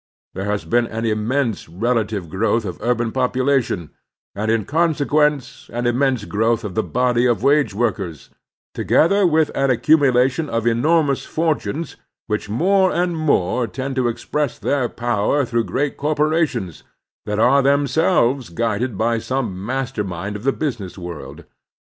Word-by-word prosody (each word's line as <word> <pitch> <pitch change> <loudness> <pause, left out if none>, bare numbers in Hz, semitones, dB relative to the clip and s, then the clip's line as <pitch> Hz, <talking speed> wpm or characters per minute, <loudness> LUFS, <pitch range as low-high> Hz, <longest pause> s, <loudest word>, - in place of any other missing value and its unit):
There 95 - -4
has 105 0 -2
been 120 0 +1
an 115 +1 -4
immense 115 - -1
relative 110 0 -1
growth 110 +6 0
of 90 - -6
urban 120 -1 0
population, 130 - 0 0.4
and, 105 +2 -3
in 110 -2 +1
consequence, 150 -3 0
an 120 +1 -3
immense 125 -2 +1
growth 115 +3 0
of 105 -4 -5
the 110 - +1
body 125 +1 +1
of 120 -1 0
wage 140 -5 +3
workers, 95 - -3 0.4
together 200 +4 +3
with 160 -2 +2
an 135 0 +1
accumu 140 +2 +4
lation 130 +5 +1
of 115 -1 -1
enormous 140 +4 +2
fortunes 160 0 -2 0.3
which 105 -1 -3
more 185 - +3
and 175 0 0
more 125 - +1
tend 135 +3 -5
to 130 -2 +1
express 125 +4 -2
their 135 -4 0
power 120 +4 0
through 115 -1 -1
great 145 +2 -2
cor 150 +2 -1
porations 150 - 0 0.5
that 105 0 -1
are 130 +5 +4
themselves 140 - +2
guided 115 +3 -2
by 115 +2 +1
some 110 -7 -3
master 130 0 -2
mind 95 +2 -5
of 105 - -7
the 135 - +3
business 120 -13 -4
world. 85 -3 -8
125 Hz, 150 wpm, -20 LUFS, 110-140 Hz, 0.5 s, accumu